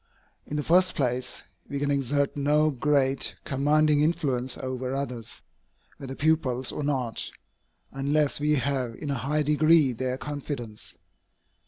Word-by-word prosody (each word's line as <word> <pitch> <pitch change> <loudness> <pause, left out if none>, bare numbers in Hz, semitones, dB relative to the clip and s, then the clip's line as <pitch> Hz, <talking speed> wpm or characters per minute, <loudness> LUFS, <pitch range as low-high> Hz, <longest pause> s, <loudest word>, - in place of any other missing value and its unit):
In 150 - -4
the 150 - -1
first 180 +4 +3
place, 125 -2 -1 0.3
we 140 - -3
can 145 0 0
exert 140 +1 0
no 150 +2 +3
great, 135 0 +1
commanding 150 +2 +3
influence 135 -6 0
over 130 0 -3
others, 125 -5 -5 0.5
whether 135 -1 -7
pupils 140 -5 +1
or 150 - -4
not, 130 -5 -1 0.6
unless 145 +2 +1
we 150 +1 +2
have 130 -4 -1
in 145 +3 -5
a 135 - -2
high 150 +4 0
degree 150 -1 +4
their 130 +2 -2
confidence. 120 - -6
140 Hz, 135 wpm, -27 LUFS, 130-150 Hz, 0.6 s, degree